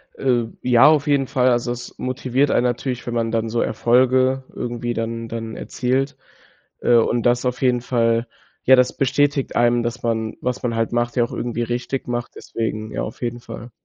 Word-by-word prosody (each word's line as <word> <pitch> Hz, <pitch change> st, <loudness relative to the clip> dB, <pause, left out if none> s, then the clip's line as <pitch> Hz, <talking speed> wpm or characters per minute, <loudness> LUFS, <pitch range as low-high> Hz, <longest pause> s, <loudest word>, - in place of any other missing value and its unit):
Äh. 125 Hz, -3 st, +1 dB, 0.2 s
Ja, 125 Hz, +1 st, +6 dB
auf 150 Hz, -1 st, +4 dB
jeden 140 Hz, -2 st, +2 dB
Fall. 130 Hz, 0 st, +2 dB
Also, 120 Hz, 0 st, +1 dB
es 120 Hz, 0 st, -7 dB
motiviert 130 Hz, +2 st, 0 dB
einen -, -, +3 dB
natürlich, 125 Hz, 0 st, -2 dB
wenn 120 Hz, -, -2 dB
man 115 Hz, -1 st, 0 dB
dann 115 Hz, 0 st, -1 dB
so 115 Hz, +1 st, 0 dB
Erfolge 130 Hz, +2 st, +2 dB
irgendwie 120 Hz, 0 st, -3 dB
dann 115 Hz, 0 st, -3 dB
dann 115 Hz, 0 st, -5 dB
erzielt. 130 Hz, +2 st, -1 dB, 0.6 s
Äh, 120 Hz, -, +3 dB
und 115 Hz, +1 st, +2 dB
das 120 Hz, +1 st, +2 dB
auf 125 Hz, +1 st, -2 dB
jeden 125 Hz, -1 st, +3 dB
Fall 115 Hz, -1 st, +1 dB, 0.4 s
ja, 130 Hz, -, +7 dB
das 125 Hz, -1 st, +3 dB
bestätigt 145 Hz, +1 st, +1 dB
einem, 120 Hz, 0 st, +3 dB
dass 120 Hz, +1 st, -4 dB
man, 110 Hz, -1 st, -1 dB
was 125 Hz, -1 st, -2 dB
man 120 Hz, -1 st, 0 dB
halt 115 Hz, 0 st, 0 dB
macht 120 Hz, 0 st, 0 dB
ja 125 Hz, -, +2 dB
auch -, -, -6 dB
irgendwie 120 Hz, 0 st, -3 dB
richtig 120 Hz, +3 st, -3 dB
macht, 120 Hz, 0 st, -3 dB
deswegen 110 Hz, -1 st, -4 dB
ja, -, -, -3 dB
auf 110 Hz, -, -7 dB
jeden 120 Hz, 0 st, -2 dB
Fall. 120 Hz, 0 st, -9 dB
120 Hz, 195 wpm, -21 LUFS, 115-130 Hz, 0.6 s, ja